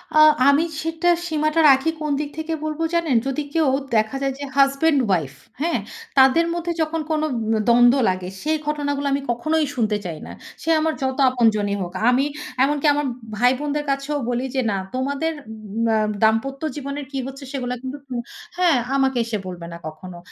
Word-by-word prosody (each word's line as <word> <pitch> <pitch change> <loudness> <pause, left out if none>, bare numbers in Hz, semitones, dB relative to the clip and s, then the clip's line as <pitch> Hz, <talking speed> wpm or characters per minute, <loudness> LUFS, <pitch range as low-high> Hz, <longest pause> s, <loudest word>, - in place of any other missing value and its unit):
আ - - +5 0.3
আমি 285 +3 +5 0.2
সেটা 325 +1 -2 0.2
সীমাটা 310 0 0
রাখি 270 +3 +4
কোন 300 -1 -1
দিক 295 -1 -3
থেকে 320 +1 -3
বলব 310 0 -3
জানেন? 335 -6 +1
যদি 270 +2 -1
কেউ 320 -3 +2 0.3
দেখা 220 +3 +1
যায় 275 -1 0
যে - - -5
হাসব্যান্ড 275 +2 +4
উইফ, 155 -7 0 0.3
হ্যাঁ? 335 +2 +1 0.4
তাদের 270 +5 +6
মধ্যে 345 0 -2
যখন 320 +1 -1
কোন 310 -1 +1
উম 225 -2 -1
দ্বন্দ্ব 240 +2 +6
লাগে, 185 -1 -3
সেই 310 +1 0
ঘটনাগুলো 285 -1 -1
আমি 280 - 0
কখনোই 310 +6 0
শুনতে 215 -4 +1
চাই 165 -3 -4
না। - - -9 0.3
সে 330 - -4
আমার 315 0 +1
যত 265 0 -1
আপনজনী 215 -5 +2
হোক। 175 -1 -5 0.2
আমি 265 +3 +2 0.4
এমনকি 290 +2 0
আমার 295 0 -1 0.3
ভাই 245 +3 +4
বোনদের 295 0 -2
কাছেও 275 +2 -2
বলি 245 +1 -1
যে, 260 - +2
"না, 195 - -1 0.2
তোমাদের 280 +5 -1 0.2
উম 215 +1 -4
অ্যা 220 - +3 0.2
দাম্পত্য 225 +5 +1
জীবনের 280 0 -5
কি 275 - -4
হচ্ছে? 270 +1 -9
সেগুলো 250 -3 -3
কিন্তু 260 +2 -5
তুম 255 -2 -4 0.4
হ্যাঁ, 350 -6 +4 0.2
আমাকে 270 -1 +2
এসে 225 -2 -2
বলবে 175 -2 -7
না - - -7
কখনো। 175 +3 -9
275 Hz, 185 wpm, -22 LUFS, 235-305 Hz, 0.4 s, তাদের